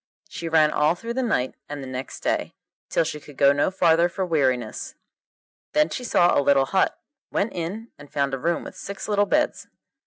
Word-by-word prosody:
She 165 - -6
ran 155 -2 +4
all 150 +3 +2
through 230 +6 -5
the 260 - -1
night 130 - 0 0.2
and 145 -1 -5
the - - -7
next 130 0 -6
day, - - -1 0.3
till - - +2
she 155 -1 -4
could 145 -1 -15
go 140 0 +6
no 145 +4 +2
farther 170 -2 +3
for 190 +2 -2
weariness. 130 -9 -1 0.8
Then 300 0 +3
she 255 - -4
saw 175 -7 +3
a - - +4
little 140 -1 +4
hut, 190 +7 +1 0.3
went 210 - 0
in, 195 +7 -5
and 145 0 -13
found 140 -1 0
a 135 - -2
room 170 +5 0
with - - -9
six 200 - -7
little 205 -1 +2
beds. 300 0 0
165 Hz, 205 wpm, -24 LUFS, 140-200 Hz, 0.8 s, go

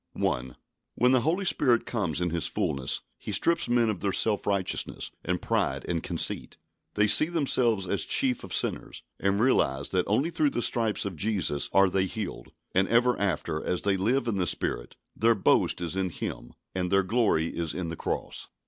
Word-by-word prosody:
1. 65 0 -2 0.4
When 125 +1 +3
the 130 -2 +4
Holy 175 +8 0
Spirit 125 -9 +2
comes 90 - -2
in 90 -1 0
His 85 -2 0
fullness, 65 -2 -1 0.2
He - - -6
strips 170 -4 +2
men 120 -1 +3
of 105 -4 -2
their 100 - -1
self 105 +1 +1
righteousness 100 -2 -2
and - - -1
pride - - -1
and 85 -1 -1
conceit. 85 - -3 0.4
They 105 - +4
see 105 +9 +6
themselves 125 - +1
as 90 -2 -1
the - - -11
chief 130 -2 +3
of - - -9
sinners, - - -1 0.2
and 100 +1 +1
realise 70 - +2
that 90 -2 0
only 135 +11 +1
through 155 -3 +2
the 120 - -2
stripes 115 -4 +1
of 100 -3 -4
Jesus 95 -6 -1
are 95 0 +5
they 95 +1 0
healed; 105 -1 -6 0.2
and 95 +1 +2
ever 120 +1 +3
after, 90 -5 -1
as 90 - -2
they 100 -1 +2
live 120 +7 0
in 110 -4 -1
the 90 -2 0
Spirit, - - -2 0.2
their 115 +2 +3
boast 100 - +2
is 85 +1 -2
in 95 -1 0
Him 60 -6 -6 0.2
and 90 -1 -1
their 95 0 +4
glory 95 -6 +1
is 85 -2 -3
in 90 -3 -3
the 85 - -5
cross. - - -4
100 Hz, 195 wpm, -27 LUFS, 90-120 Hz, 0.4 s, see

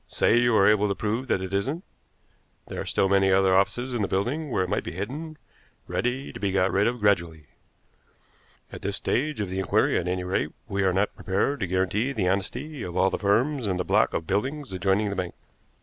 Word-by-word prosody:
Say 120 - +3
you 120 -1 +3
are 100 - +5
able 105 0 +4
to 100 - -1
prove 110 +6 -2
that 95 - 0
it 95 +1 -6
isn't, 135 - -1 0.8
there - - -5
are - - -5
still 95 - +1
many 95 0 +3
other 95 0 +4
offices 120 +7 +1
in 120 - -1
the 100 - +1
building 130 +12 -1
where 95 - +1
it - - -3
might - - -1
be - - -6
hidden, 145 - -5 0.5
ready 125 +3 -2
to - - -8
be 100 -1 0
got 95 0 +2
rid 100 +2 +2
of 120 -1 -2
gradually. 85 -7 +1 1.3
At - - -8
this 100 0 -2
stage 150 0 -1
of 100 - -3
the 95 - -2
inquiry, 95 - +2
at 85 - -4
any 90 0 -1
rate, 90 -4 -1
we 100 -2 -1
are 95 -1 +3
not 95 +3 0
prepared 100 +9 -1
to 100 - -1
guarantee 95 +8 0
the 100 -7 0
honesty 120 +10 -2
of 90 -3 -5
all 95 0 +3
the - - -2
firms 120 +5 +1
in 95 -2 0
the 90 - -2
block - - +2
of 80 - -2
buildings 135 - -2
adjoining 95 +2 +1
the - - -3
bank." 90 -2 -4
100 Hz, 225 wpm, -26 LUFS, 95-120 Hz, 1.3 s, are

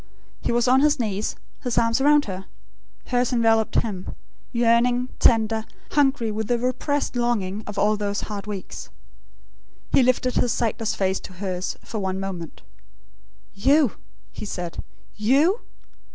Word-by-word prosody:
He - - -1
was 240 +1 +2
on 255 +1 +5
his 295 0 +3
knees, 210 -2 -1 0.3
his 245 -4 -2
arms 230 +2 +3
around 295 +1 +5
her. 190 -1 -6 0.6
Hers 245 0 +1
enveloped 225 -2 +2
him, 200 -5 -5 0.4
yearning, 240 +1 +3
tender, 220 -1 +3 0.3
hungry 270 -6 +2
with 215 0 -3
the 240 - +2
repressed 255 +3 -1
longing 220 -4 0
of 210 -1 -6
all 210 +2 +3
those 205 -1 -2
hard 210 -1 -6
weeks. 200 -3 -6 1.0
He - - +5
lifted 255 0 +2
his 245 - +2
sightless 225 -1 -1
face 190 -1 0
to 185 - -10
hers, 185 -1 -3
for 220 - -5
one 190 -1 -2
moment. 185 -4 -6 0.9
"You?" 270 +5 +4 0.4
he - - -8
said. 180 -4 -5 0.3
"YOU? 280 - +3
225 Hz, 140 wpm, -24 LUFS, 200-250 Hz, 1.0 s, on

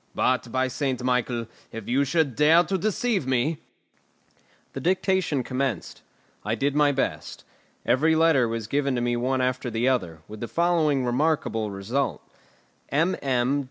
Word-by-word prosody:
But, 125 -2 0
by 130 +1 +1
St. 130 -1 -2
Michael, 125 -2 0 0.3
if 115 -2 -8
you 135 +4 +2
should 145 -3 0
dare 160 +5 +5
to 195 - -2
deceive 210 - 0
me 135 +5 0 0.6
" - - -37
The - - -4
dictation 185 -3 +1
commenced. 130 -5 -3 0.4
I 105 +2 -1
did 140 +5 0
my 145 0 +4
best. 135 - -3 0.4
Every 150 +7 +3
letter 160 -6 +4
was 115 -1 -3
given 140 +3 0
me 120 0 0
one 130 +2 0
after 125 0 -1
the 115 +2 0
other, 90 -12 -1
with 105 0 -9
the 120 - -4
following 160 -5 +1
remarkable 125 -4 0
result: 105 +8 -2 0.7
mm. 140 -4 +1
130 Hz, 150 wpm, -25 LUFS, 120-155 Hz, 0.7 s, dare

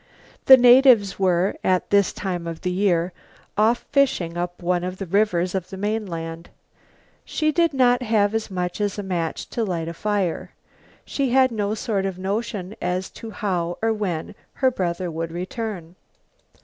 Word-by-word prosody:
The 265 - +11
natives 245 -5 +6
were, 185 0 +2
at 185 -1 +1
this 200 -1 +4
time 180 -4 -4
of 165 -1 -6
the 180 - -1
year, 180 -2 +1 0.4
off 220 +3 +2
fishing 260 - +1
up 175 0 -4
one 175 0 +1
of 185 +1 -4
the 195 - -5
rivers 185 -1 +1
of 185 -2 -3
the 190 - -8
mainland. 175 -6 -4 0.7
She 310 -1 0
did 335 0 +2
not 250 -3 +3
have 215 -3 +2
as 225 -1 -2
much 180 +1 -3
as 205 -1 -1
a 205 - -3
match 175 -4 -3
to 235 - -1
light 170 -5 -2
a 165 - -4
fire. 200 -2 -2 0.5
She 275 -2 -1
had 260 0 +4
no 210 -1 -1
sort 200 -3 -1
of 190 -2 -5
notion 200 0 -3
as 180 +1 -2
to 225 - -9
how 175 -5 -2
or 225 0 +1
when 185 -7 -3 0.2
her 260 -1 +2
brother 180 -4 -2
would 165 +1 -4
return. 180 -1 -5
195 Hz, 170 wpm, -23 LUFS, 175-220 Hz, 0.7 s, The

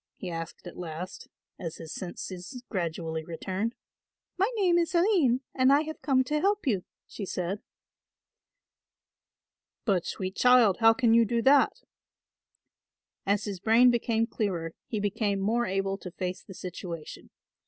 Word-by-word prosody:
he 180 - -6
asked 165 +1 -6
at 175 - -9
last, 175 +2 -6 0.3
as 165 -3 -5
his 160 -1 -8
senses 185 +6 -7
gradually 165 -4 -3
returned. 190 +7 -3 0.6
"My 390 +4 +2
name 360 -5 +3
is 340 +1 -1
Aline 340 - +3
and 260 0 +4
I 285 +1 +6
have 315 0 -6
come 260 -3 +3
to 300 +4 -1
help 405 +2 +1
you," 200 -8 0 0.2
she 210 - -8
said. 185 +1 -3 2.2
"But, 190 -5 +1
sweet 190 +1 -4
child, 250 -6 +5
how 225 0 +6
can 235 -2 +3
you 230 0 +6
do 230 +1 0
that?" 275 +1 +4 1.4
As 200 +1 +2
his 200 -3 -4
brain 230 +5 +5
became 230 -1 +1
clearer 180 -8 -2
he 215 - -2
became 205 0 0
more 230 +5 +1
able 195 +1 -1
to 180 - -7
face 180 +1 -4
the 190 - -12
situation. 175 -3 -7
205 Hz, 145 wpm, -28 LUFS, 180-250 Hz, 2.2 s, I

